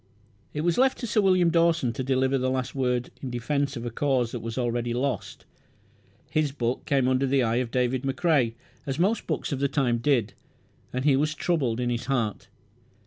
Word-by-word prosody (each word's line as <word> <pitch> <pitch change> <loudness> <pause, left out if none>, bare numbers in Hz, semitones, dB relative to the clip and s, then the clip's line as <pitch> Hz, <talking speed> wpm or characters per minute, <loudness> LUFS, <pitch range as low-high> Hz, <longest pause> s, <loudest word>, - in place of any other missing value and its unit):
It 150 - -3
was 170 +4 +1
left 260 0 +3
to 245 - -5
Sir 215 -1 +2
William 185 -3 +4
Dawson 165 -7 +2
to 130 - -3
deliver 130 +1 +1
the 130 0 0
last 130 -1 -2
word 125 -2 -1
in 130 - -4
defence 140 +3 -1
of 120 - -5
a 120 - -3
cause 125 -2 0
that 120 - -4
was 115 +1 -6
already 120 -1 -1
lost. 125 -4 -3 0.9
His 155 -2 +1
book 125 -3 -2
came 135 -3 +2
under 130 +1 +2
the 135 -1 +2
eye 115 0 +1
of 125 -1 -1
David 125 +1 0
McCrae, 135 -3 +1 0.3
as 135 0 -2
most 200 +7 +1
books - - -2
of 135 - -2
the 140 - +2
time 130 -4 +1
did, 120 -4 +1 0.6
and 130 +2 -3
he 145 -3 +5
was 150 +3 0
troubled 135 -10 0
in 120 0 0
his 120 +1 -2
heart. 120 -6 -1
130 Hz, 200 wpm, -26 LUFS, 120-145 Hz, 0.9 s, he